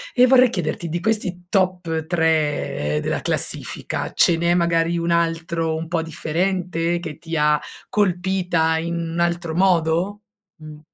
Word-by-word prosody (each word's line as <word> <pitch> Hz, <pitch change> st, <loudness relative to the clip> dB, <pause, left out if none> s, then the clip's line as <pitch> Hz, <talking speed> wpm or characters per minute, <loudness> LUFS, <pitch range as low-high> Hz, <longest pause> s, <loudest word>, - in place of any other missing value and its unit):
E 250 Hz, 0 st, +7 dB
vorrei 255 Hz, -1 st, +6 dB
chiederti 170 Hz, -4 st, -3 dB
di 170 Hz, +2 st, -2 dB
questi 185 Hz, -4 st, -2 dB
top 180 Hz, -4 st, 0 dB
3 155 Hz, -, 0 dB
della -, -, -1 dB
classifica, -, -, -3 dB
ce 170 Hz, -, +4 dB
n'è 170 Hz, +1 st, +1 dB
magari 170 Hz, -1 st, +1 dB
un 170 Hz, 0 st, -1 dB
altro 165 Hz, -1 st, 0 dB
un 160 Hz, +1 st, -4 dB
po' 170 Hz, 0 st, -1 dB
differente 170 Hz, +1 st, -1 dB
che 155 Hz, -4 st, -7 dB
ti 165 Hz, -1 st, -4 dB
ha 150 Hz, 0 st, +3 dB, 0.3 s
colpita 180 Hz, -4 st, +1 dB
in 170 Hz, +1 st, -3 dB
un 170 Hz, 0 st, -3 dB
altro 170 Hz, -1 st, 0 dB
modo? 180 Hz, +2 st, +1 dB, 0.3 s
Mh. 155 Hz, -4 st, -11 dB
170 Hz, 145 wpm, -21 LUFS, 160-180 Hz, 0.3 s, E